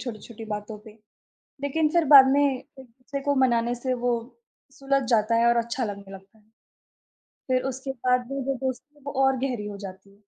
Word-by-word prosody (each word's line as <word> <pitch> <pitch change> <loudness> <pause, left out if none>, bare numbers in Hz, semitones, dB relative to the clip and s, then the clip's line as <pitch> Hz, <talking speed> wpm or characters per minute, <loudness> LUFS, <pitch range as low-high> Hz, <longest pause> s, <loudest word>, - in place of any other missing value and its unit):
छोटी-छोटी 230 -2 -8
बातों 210 +1 -6
पे, 220 - -11 0.7
लेकिन 305 +2 +1
फिर 340 -1 +3
बाद 270 -1 +11
में 285 - +3
एक-दूसरे 265 0 -5
को 285 0 +2
मनाने 240 -1 +1
से 255 +1 -2
वो 245 - +3 0.7
सुलझ 275 0 +1
जाता 225 0 +3
है 235 - +3
और 235 - +3
अच्छा 235 +2 -3
लगने 200 -2 -7
लगता 195 +3 -15
है। 210 - -28 1.0
फिर 255 -1 +2
उसके 265 +1 -5 0.2
बाद 250 -1 +2
में 275 0 -3
जो 275 +1 -1
दोस्ती 265 +3 -5
है, 295 - -23
वो 285 - -4
और 265 -1 +2
गहरी 245 -6 -3
हो 205 -1 -7
जाती 195 0 -10
है। 205 - -29
250 Hz, 190 wpm, -25 LUFS, 220-270 Hz, 1.0 s, बाद